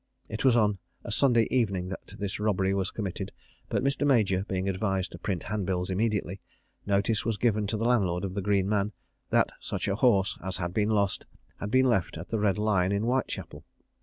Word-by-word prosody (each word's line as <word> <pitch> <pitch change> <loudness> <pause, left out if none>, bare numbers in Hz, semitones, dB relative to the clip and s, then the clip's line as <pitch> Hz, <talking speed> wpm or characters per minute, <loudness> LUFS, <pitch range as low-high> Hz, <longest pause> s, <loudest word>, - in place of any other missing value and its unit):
It 110 - -4
was 130 -3 +5
on 105 -3 +2 0.2
a - - -6
Saturday 120 -5 +4
evening 100 -7 +1
that 95 0 -8
this 100 -1 -4
robbery 95 -2 +1
was 95 -1 0
committed; 100 -2 -4 0.4
but - - 0
Mr. 140 +1 +1
Major 105 -9 +3
being 95 0 -2
advised 95 -1 -1
to - - -9
print 95 -5 -2
hand 105 -3 -3
bills 90 0 -1
immediately, 100 -2 -1 0.5
notice 100 +2 +2
was 115 -2 -1
given 105 -3 +1
to 110 +2 -1
the 115 - -1
landlord 100 -7 +2
of 95 - -4
the 100 - -2
Green 100 -1 +1
Man, 105 0 0 0.4
that - - +3
such - - -3
a 100 - +1
horse 100 -6 +3
as 95 0 -2
had 85 -1 -3
been 105 +1 +1
lost 100 -3 0 0.3
had 100 - -4
been 130 +4 +4
left 105 -10 +1
at 85 +1 -8
the 110 - -1
Red 105 -1 +2
Lion 100 -3 +2
in 100 +1 0
Whitechapel. 125 +3 -2
100 Hz, 205 wpm, -28 LUFS, 95-110 Hz, 0.5 s, was